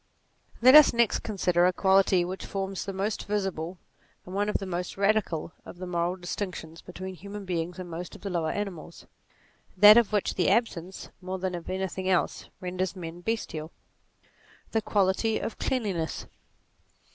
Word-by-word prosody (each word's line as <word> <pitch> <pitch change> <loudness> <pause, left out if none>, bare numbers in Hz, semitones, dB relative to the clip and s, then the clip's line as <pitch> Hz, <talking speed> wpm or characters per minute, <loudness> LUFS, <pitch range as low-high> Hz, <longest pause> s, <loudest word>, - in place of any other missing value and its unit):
Let 255 +1 +9
us 305 -1 +9
next 235 -1 +2
consider 180 -4 +2
a - - +3
quality 190 -1 +3
which 185 +2 -5
forms 195 -1 -3
the 195 - -3
most 195 +2 -2
visible, 190 -4 -2 0.5
and 180 - -9
one 205 +1 0
of - - +1
the 195 - -6
most 180 0 -4
radical 200 -6 +1
of - - -11
the 185 - -6
moral 175 0 -1
dis 175 -1 -5
tinctions 165 -5 -6
between 185 +1 -7
human 200 +3 -8
beings 175 -1 -3
and 185 -1 -6
most 170 +1 -7
of - - -13
the 200 - -4
lower 165 -3 0
animals; 185 -5 -5 0.7
that 210 +3 +10
of 235 -3 +4
which 210 -2 0
the 180 - +1
absence, 190 -4 -1
more 185 +1 -4
than 185 0 -3
of 175 -1 -6
anything 190 0 -2
else, 185 - 0
renders 185 -1 -3
men 170 -1 -7
bestial; 175 -7 -3 1.0
the 225 - +1
quality 205 +2 +1
of 225 - -5
cleanliness. 195 -11 -2
185 Hz, 170 wpm, -27 LUFS, 175-205 Hz, 1.0 s, that